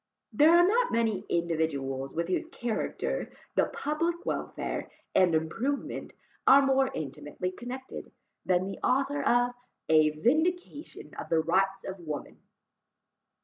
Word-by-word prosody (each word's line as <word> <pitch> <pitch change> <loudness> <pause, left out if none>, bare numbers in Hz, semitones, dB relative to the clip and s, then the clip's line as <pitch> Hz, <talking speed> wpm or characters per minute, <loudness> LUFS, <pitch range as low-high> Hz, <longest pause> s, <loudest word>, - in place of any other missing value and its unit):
There 300 +2 +6
are 345 +1 +6
not 485 +4 +2
many 225 -4 0
individuals 145 -6 -1
with 170 +1 -2
whose 185 - -1
character 240 -8 -3 0.2
the - - +3
public 335 +4 -2
welfare - - -3 0.2
and 180 -3 +4
improvement 225 - -2 0.3
are 275 0 +8
more 270 0 +3
intimately 150 +4 -4
connected, 250 +6 -8 0.3
than 185 0 +2
the 195 - -6
author 275 +2 +1
of 245 0 +3 0.4
A 155 -1 +6
Vindication 305 - -1
of - - -6
the 165 - +3
Rights 190 +4 +1
of 190 0 -6
Woman. 155 -4 -6
195 Hz, 125 wpm, -29 LUFS, -, 0.4 s, are